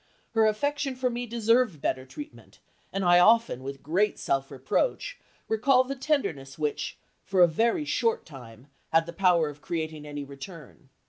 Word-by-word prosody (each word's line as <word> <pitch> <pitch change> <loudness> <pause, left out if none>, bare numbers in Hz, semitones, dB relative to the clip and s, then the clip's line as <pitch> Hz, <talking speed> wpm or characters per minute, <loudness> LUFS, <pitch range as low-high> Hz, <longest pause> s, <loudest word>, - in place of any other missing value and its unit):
Her 225 -1 +4
affection 280 +5 -1
for 250 0 0
me 240 +1 -4
deserved 230 - +2
better 130 -1 -2
treatment, 295 - -11 0.3
and 195 -1 -2
I 175 0 +6
often, 225 - +4
with 135 +1 -7
great 190 +8 +1
self 135 0 -1
reproach, 150 - -1 0.3
recall 255 +4 +4
the 270 +2 -5
tenderness 170 - -2
which, 150 -2 -2 0.3
for 190 -2 +4
a - - +7
very 230 - +1
short 230 -5 0
time, 125 -5 -12 0.3
had 165 0 +4
the 170 - -8
power 175 -3 +3
of 145 0 -9
creating 155 -3 -4
any 145 -1 -5
return. 140 +1 -11
180 Hz, 160 wpm, -27 LUFS, 145-235 Hz, 0.3 s, a